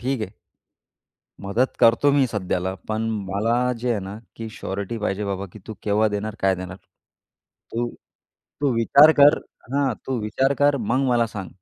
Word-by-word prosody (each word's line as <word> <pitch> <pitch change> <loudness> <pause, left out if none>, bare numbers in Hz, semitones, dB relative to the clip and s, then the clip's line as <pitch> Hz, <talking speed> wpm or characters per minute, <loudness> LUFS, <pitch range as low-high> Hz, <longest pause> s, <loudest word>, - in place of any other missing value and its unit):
"ठीक 130 +1 -1
आहे" 105 - -4 1.1
"मदत 110 +7 0
करतो 115 +5 +5
मी 140 -2 +4
सध्याला. 95 -4 -2
पण 110 +1 -1 0.2
मला 115 +5 +1
जे 125 +1 -2
आहे 110 -4 0
ना, 95 +2 -7 0.2
की 115 0 -6
शोरीटी 100 +1 -5
पाहिजे 105 -1 -2
बाबा, 100 0 -3
की - - -11
तू 110 - -6
केव्हा 105 +1 +2
देणार, 105 +1 -3
काय 95 0 +3
देणार? 90 0 -7 1.0
तू 120 +1 -1 0.7
तू 145 -2 +2
विचार 140 +7 +6
कर" 145 +2 +7 0.3
हां. 140 -3 +1
"तू 130 -2 -1
विचार 130 +6 +1
कर 145 0 +4
मग 130 +5 0
मला 120 -2 +3
सांग. 105 -4 -7
115 Hz, 165 wpm, -23 LUFS, 100-130 Hz, 1.1 s, कर